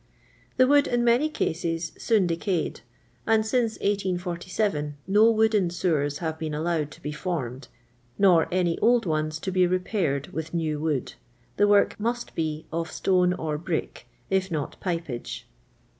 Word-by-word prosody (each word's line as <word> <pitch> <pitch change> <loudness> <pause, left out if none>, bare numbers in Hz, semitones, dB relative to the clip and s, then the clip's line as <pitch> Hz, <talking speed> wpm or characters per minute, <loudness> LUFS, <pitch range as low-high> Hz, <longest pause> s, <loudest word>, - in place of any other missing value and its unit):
The 255 - +6
wood, 285 +2 +4
in 240 0 +1
many 240 +6 +3
eases, 165 0 -1
soon 220 -5 +2
decayed, 170 0 -1 0.5
and 220 -1 +3
since 230 0 +1
1847 180 -5 -2
no 210 +4 +5
wooden 220 -4 +3
sewers 155 -5 0
have 160 -2 -4
been 155 -2 -3
allowed 155 -1 -1
to - - -17
be 150 - -3
fonned, 150 -6 -4 0.5
nor 180 -5 +5
any 175 -2 +1
old 235 0 +3
ones 155 -1 -1
to 190 +4 -4
be 185 -1 +3
re 185 +1 +2
paired 165 -8 -2
with 160 +1 -5
saw 155 -3 -1
wood; 150 -4 -1 0.4
the 205 - +4
wock 205 0 +3
must 235 +3 -2
be 155 -1 -3
of 165 0 -2
stone 180 -1 +2
or 155 -4 -3
brick, 165 0 -4 0.2
if 190 0 +1
not 155 -5 -3
pipeage. 165 -9 -4
175 Hz, 155 wpm, -26 LUFS, 155-205 Hz, 0.5 s, The